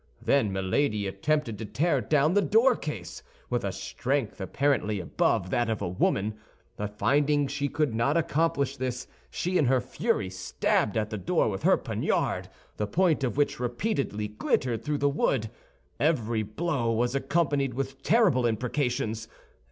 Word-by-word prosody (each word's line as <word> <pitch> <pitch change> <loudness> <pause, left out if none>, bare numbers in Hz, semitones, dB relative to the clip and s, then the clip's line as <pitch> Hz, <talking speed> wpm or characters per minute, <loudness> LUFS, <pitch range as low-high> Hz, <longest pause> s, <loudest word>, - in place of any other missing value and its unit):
Then 125 -8 +2
Milady 100 +3 0
attempted 115 +4 -1
to 110 - -4
tear 145 - +1
down 150 - +2
the 205 - +4
doorcase, 205 - +1 0.3
with - - 0
a - - -1
strength 130 -6 -2
apparently 110 -1 0
above 90 0 0
that 120 -1 +1
of 110 - -1
a 100 - -2
woman; 100 +4 0 0.4
but 105 0 -5
finding 145 +2 +2
she 140 +1 -2
could 150 -5 0
not 120 +8 +2
accomplish 150 -4 0
this, 130 0 -3 0.2
she 180 - -1
in 150 - +3
her 130 +1 +3
fury 120 -5 -1
stabbed 95 +3 0
at 110 0 -1
the 105 - -3
door 90 - +1
with - - -4
her - - +4
poniard, - - -1 0.3
the 105 - -1
point 165 - +2
of 130 +1 -1
which 145 -4 +1
repeatedly 125 - -1
glittered 115 +2 -1
through 150 -1 -1
the 145 - +2
wood. 135 -5 0 0.5
Every 120 -8 +1
blow 120 +2 -1
was 120 +2 +1
accompanied 140 -3 0
with 135 0 -4
terrible 185 - +3
imprecations. 115 -1 -1
130 Hz, 155 wpm, -27 LUFS, 110-145 Hz, 0.5 s, the